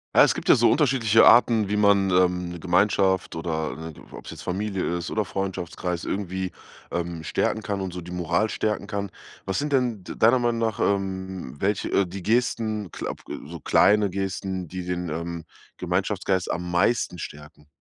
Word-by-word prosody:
Ja, - - +9
es - - +4
gibt - - -7
ja - - +9
so 115 -1 +4
unterschiedliche 125 -6 +4
Arten, 115 -4 +6
wie 105 - 0
man, 100 -2 +4
ähm, 90 -1 +2
'ne 85 0 -7
Gemeinschaft 95 +1 +2
oder, 80 -1 -4
äh - - -14 0.2
ob's - - -9
jetzt - - -9
Familie 95 -2 -2
ist 85 0 -5
oder 110 -1 0
Freundschaftskreis 90 -2 -4
irgendwie, 95 -1 -3 0.4
ähm, 85 -1 -3
stärken 110 - 0
kann 100 -2 -3
und 95 -2 -4
so 90 - -5
die 90 +1 -10
Moral 90 +4 0
stärken 105 -1 -2
kann. 100 -1 -4 0.3
Was 95 -1 -1
sind 145 0 -2
denn 120 -7 +1
d - - -6
deiner 120 +3 +5
Meinung 120 -1 0
nach, 115 -2 -1
ähm 95 -6 -2
welche 100 +1 0
äh, 100 - +3
die 95 +1 -7
Gesten, 110 -3 0
glaube, - - -5
äh - - -7
so 85 0 -7
kleine 105 +7 +4
Gesten, 95 -1 -3
die 90 +1 -6
den, 90 -1 -3
ähm, 85 +1 -4 0.3
Gemeinschaftsgeist 95 +1 -1
am 90 +1 -3
meisten 90 0 +1
stärken? 75 0 -10
95 Hz, 180 wpm, -25 LUFS, 90-105 Hz, 0.4 s, Ja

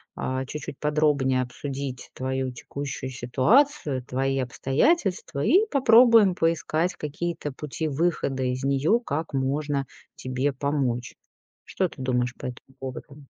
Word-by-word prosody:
а, 130 0 -2
чуть-чуть 145 0 -7
подробнее 150 -4 +2
обсудить 135 +1 -5
твою 130 0 -2
текущую 135 +1 -6
ситуацию, 135 - +2
твои 135 +2 -1
обстоятельства, 140 - 0
и 385 - +5
попробуем 230 -6 +6
поискать 165 +1 0
какие-то 155 +1 -4
пути 150 +3 -4
выхода 145 -3 0
из 125 +1 -2
неё, 140 - +2
как 160 - -4
можно 140 +1 -1 0.3
тебе 130 +2 -1
помочь. 130 -3 -1 0.5
Что 185 -2 -1
ты - - -15
думаешь 125 -1 0
по - - -9
этому 125 +1 -8
поводу? 135 +2 -8
140 Hz, 120 wpm, -25 LUFS, 130-160 Hz, 0.5 s, попробуем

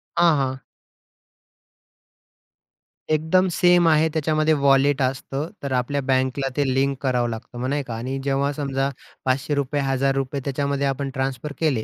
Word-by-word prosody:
हां, 170 -2 +5
हां. 130 -1 -1 2.5
एकदम 160 +5 +2
सेम 175 -1 +5
आहे. 155 0 +4
त्याच्यामध्ये 155 0 +2
वॉलेट 140 -1 +3
असतं, 135 +3 -2 0.2
तर 140 - -3
आपल्या 130 +3 0
बँकला 130 +1 +1
ते 145 - +2
लिंक 135 +1 +1
करावं 125 -3 +1
लागतं, 115 +2 -7
मग 125 - -2
नाही 145 +1 -1
का 120 -3 -7
आणि 130 +4 -4
जेव्हा 140 +1 0
समजा 135 -1 -1 0.4
₹500, 140 +2 0
₹1,000 135 0 0
त्याच्यामध्ये 140 0 -1
आपण 135 0 -2
ट्रान्सफर 135 +2 -3
केले, 140 -9 +1
140 Hz, 135 wpm, -23 LUFS, 130-145 Hz, 2.5 s, हां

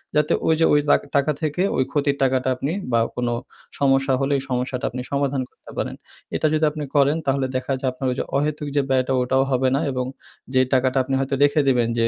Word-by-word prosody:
যাতে 150 0 +3
ওই 160 - +5
যে 165 - +5
ওই 145 - +5
লা - - +7 0.2
টাকা 140 +2 +3
থেকে 155 +3 -1 0.2
ওই 130 - +3
ক্ষতির 140 -1 +1
টাকাটা 130 0 +1
আপনি 135 +4 -3 0.2
বা 115 - +3 0.2
কোনো 120 -1 -1 0.5
সমস্যা 135 -1 +3
হলে 135 +1 +1
এই 135 - -6
সমস্যাটা 125 0 -2
আপনি 125 +1 -4
সমাধান 140 -1 0
করতে - - -16
পারেন। - - -2 0.4
এটা - - +2
যদি 155 0 +2
আপনি 150 0 -5
করেন 145 +2 +4
তাহলে 135 0 +1
দেখা 130 +1 -1
যায় 130 - +1
আপনার 130 +1 -3
যে - - 0
অহেতুক 150 +1 -1
যে 145 - +4
ব্যয়টা 130 0 +1
ওটাও 130 +2 +2
হবে 130 0 +2
না - - +1
এবং 125 -1 -2 0.5
যে 130 - +5
টাকাটা 130 0 +2
আপনি 135 +1 -4
হয়তো 135 0 -2
রেখে 145 +1 +4
দিবেন 125 -3 +3
যে 115 - +3
135 Hz, 220 wpm, -22 LUFS, 130-145 Hz, 0.5 s, লা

